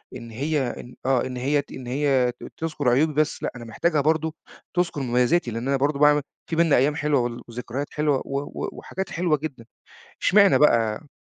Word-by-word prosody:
إن 115 -1 -9
هي 145 +5 -1 0.2
إن 125 - -11
آه 130 -2 +2
إن 130 -1 -5
هي 140 +3 +1
ت - - -20
إن 125 -2 -8
هي 130 -2 +2
ت - - -11
تذكر 155 -5 -1
عيوبي 150 +6 +3
بس 150 +1 0
لأ، - - -1
أنا 120 - -8
محتاجها 150 +7 0
برضه 160 +1 +1 0.4
تذكر 175 -5 0
مميزاتي 125 +3 +1
لأن 115 +4 -4
أنا 140 - +2
برضو 140 +1 0
باعمل 150 0 +5 0.3
فيه 165 - -2
بيننا 165 -3 +4
أيام 140 +4 +2
حلوة 150 -2 +1
ول 120 0 -3
وذكريات 125 +4 -5
حلوة 150 -3 +1
و 140 - -2
و 145 - -5
وحاجات 190 0 -6
حلوة 165 -3 +1
جدًا. 135 -6 -7 0.6
اشمعنى 200 0 +5
بقى 115 -1 +3
140 Hz, 200 wpm, -24 LUFS, 125-155 Hz, 0.6 s, باعمل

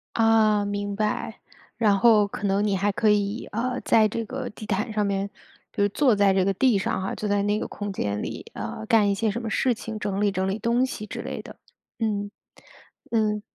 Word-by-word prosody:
啊， 220 -2 +4
明 205 0 -3
白。 215 +1 -2 0.4
然 210 -3 +3
后 220 -3 +6
可 205 - -3
能 200 +2 +1
你 200 - +1
还 205 +2 +1
可 215 +2 +2
以， 205 +2 +1
呃， 250 +3 -2
在 220 -1 +4
这 230 +2 -3
个 260 +1 -5
地 215 - -10
毯 210 +2 -1
上 210 -1 +1
面， 200 0 -1 0.4
就 205 0 +2
坐 250 0 +3
在 200 -1 +4
这 190 -1 +2
个 195 - +2
地 240 +1 +3
上 190 - -1
哈， 190 - -3
坐 210 - -4
在 200 0 +1
那 205 +1 +1
个 - - -3
空 205 -1 -5
间 105 - -2
里， - - -6
呃， 110 - -6
干 210 -3 +4
一 - - +2
些 220 +2 0
什 235 +4 -3
么 225 - -4
事 250 +2 +2
情， 220 -1 -7
整 200 0 -2
理 205 -1 +3
整 190 0 -1
理 195 +2 -1
东 235 +3 +1
西 215 -4 -6
之 - - -6
类 - - -5
的。 - - -12 0.4
嗯， 205 -2 -1 0.8
嗯。 215 -2 +1
210 Hz, 235 characters per minute, -25 LUFS, 200-225 Hz, 0.8 s, 后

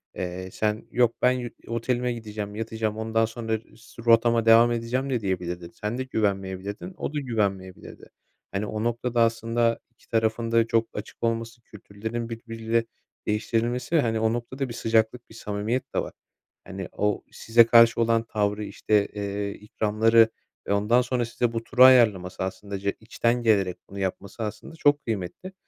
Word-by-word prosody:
eee, 90 +1 -5
sen 110 +2 -2
yok 120 -1 +3
ben 125 - +5
yü 125 -2 -3 0.2
otelime 120 +1 -1
gideceğim, 105 -3 -6
yatacağım, 110 -1 -3
ondan 110 0 +1
sonra 110 -1 -3 0.2
su 115 +1 -14
rotama 115 0 +4
devam 115 +1 +7
edeceğim 120 +3 -1
de 125 -4 0
diyebilirdin. 90 -3 -3
Sen 105 +3 -4
de 130 - -1
güvenmeyebilirdin, 100 - -3
o - - -4
da 150 - -1
güvenmeyebilirdi. 100 -8 -3 0.4
Hani, 100 +2 -2
o 110 +1 -3
noktada 120 +1 0
aslında 115 0 +1
iki 120 - -28
tarafın 115 0 0
da 115 0 +3
çok 115 0 +2
açık 105 +2 -8
olması, 115 0 -2
kültürlerin 110 +3 -6
birbiriyle 115 0 -2 0.4
değiştirilmesi 115 +6 0
ve, 160 - +5
hani, 115 -3 0
o 110 0 +2
noktada 130 +3 -4
bir - - -5
sıcaklık, 115 +1 0
bir 110 - -14
samimiyet 115 +5 -3
de - - +3
var. - - -4 0.5
Hani, 95 0 -7
o 105 -1 -1
size 115 +1 +4
karşı 115 0 +6
olan 115 0 +2
tavrı, 105 -2 -1
işte, 105 0 +1
eee, 100 0 -4
ikramları 110 +2 +3 0.4
ve - - +1
ondan 105 +5 +3
sonra 125 -1 -1
size 120 0 -1
bu 115 0 -2
turu 125 +1 +4
ayarlaması 110 -9 +5
aslında 100 +1 -5
je 100 +1 -1
içten 115 +2 0
gelerek 100 -5 +2
bunu 100 - -8
yapması 100 +4 -4
aslında 110 +8 -6
çok 145 -2 +3
kıymetli, 110 - -4
115 Hz, 165 wpm, -25 LUFS, 105-120 Hz, 0.5 s, devam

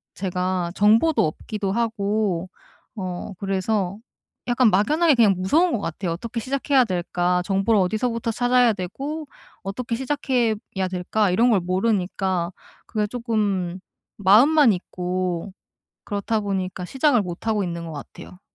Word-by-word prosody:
제가 180 -2 -2
정보도 220 - +4
없기도 200 +5 -4
하고 205 -5 -1 0.5
어 185 0 -5
그래서 195 0 -1 0.5
약간 240 -2 +4
막연하게 300 - +3
그냥 210 -5 +4
무서운 310 - +2
것 225 - 0
같아요. 170 +1 -3
'어떻게 230 +6 -5
시작해야 270 +1 +2
될까?' 180 -1 0
'정보를 195 +2 +2
어디서부터 230 +4 -1
찾아야 245 0 +3
되고 275 - -5 0.4
어떻게 230 +5 -3
시작해야 255 -4 0 0.4
될까?' 185 +3 0
이런 235 +6 +3
걸 200 - +4
모르니까 185 -2 0 0.4
그게 215 -2 -1
쪼금 205 -6 -1 0.4
마음만 235 - +6
있고 180 0 -3 0.5
그렇다 210 +2 -1
보니까 190 -2 -3
시작을 265 -2 +2
못 180 +3 -7
하고 210 -2 +1
있는 170 -1 -5
것 160 - -7
같아요. 180 +5 -10
205 Hz, 305 characters per minute, -23 LUFS, 185-235 Hz, 0.5 s, 마음만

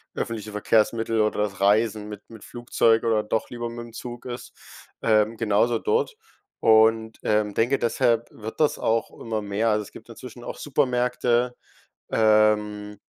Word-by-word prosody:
öffentliche 110 -2 -4
Verkehrsmittel 110 +1 +1
oder 105 -1 +1
das 95 -2 -5
Reisen 105 +1 +2
mit 105 -1 -9
mit 115 -2 -13
Flugzeug 115 -1 +1
oder 110 -2 +2
doch 110 +1 -2
lieber 120 -1 -4
mit 120 0 -7
dem 115 - -14
Zug 120 -1 -8
ist, 125 -1 -7 0.5
ähm, 110 0 +2
genauso 115 +2 +2
dort 455 0 0 0.4
und, 110 0 +4
ähm, 105 -1 +1
denke, 120 +6 +2
deshalb 120 -1 +1
wird 110 +5 -9
das 150 - +2
auch 115 0 0
immer 110 -2 -3
mehr. 105 +3 0
Also, 105 0 +1
es - - -14
gibt - - -14
inzwischen 120 +1 -11
auch - - -7
Supermärkte, 125 -3 0 0.6
ähm 105 -1 +2
110 Hz, 155 wpm, -24 LUFS, 105-120 Hz, 0.6 s, und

